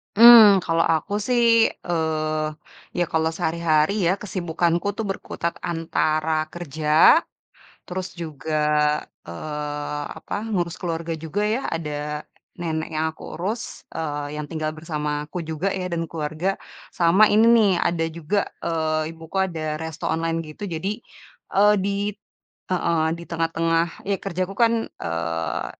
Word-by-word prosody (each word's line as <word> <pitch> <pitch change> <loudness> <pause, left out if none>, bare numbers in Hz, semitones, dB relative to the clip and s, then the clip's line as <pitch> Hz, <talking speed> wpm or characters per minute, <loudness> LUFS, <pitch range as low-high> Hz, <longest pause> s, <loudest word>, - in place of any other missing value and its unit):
Mmm, 220 -4 +9
kalau 165 0 +2
aku 160 +6 -2
sih, 235 -2 +5 0.2
eee, 155 -2 0 0.5
ya, - - +4
kalau 160 0 +2
sehari-hari 160 +1 +1
ya, 180 - +4
kesibukanku 175 -2 -1
tuh, 225 - -1
berkutat 170 -3 -3
antara 155 -2 0
kerja, 155 - +4 0.7
terus 185 0 -5
juga, 155 -2 -6 0.8
eee, 150 - -4 0.2
apa - - -7
ngurus 175 -5 -1
keluarga 165 -2 -3
juga, 165 +6 -3
ya. 225 +5 0
Ada, 150 -2 -4 0.3
nenek 160 -3 -3
yang 155 +1 0
aku - - -16
urus, 210 +7 -4
eee, 145 -1 -3
yang 150 - -4
tinggal 155 -1 -2
bersamaku 150 0 -3
juga 160 +5 -2
ya, 185 -1 -3
dan 165 0 -1
keluarga, 155 +2 -2 0.4
sama 175 +5 +5
ini 215 +2 +5
nih, 210 -3 +5
ada 170 -1 +1
juga, 170 +5 -1 0.3
eee, 155 -1 0
ibuku 165 +3 -10
ada 175 -4 -1 0.2
resto 160 -1 -6
online 165 +1 0
gitu. 155 +7 -8
Jadi, 190 +7 -3 0.5
eee, 205 +2 +6
di 200 +1 -1 0.7
heeh, 170 -3 +1
di 170 - -9
tengah 165 -1 +1
tengah 165 0 +2 0.2
ya. 195 -1 -1
Kerjaku, 185 0 -3
kan, 230 -1 +5 0.2
eee, 85 -1 -3
165 Hz, 135 wpm, -23 LUFS, 155-185 Hz, 0.8 s, Mmm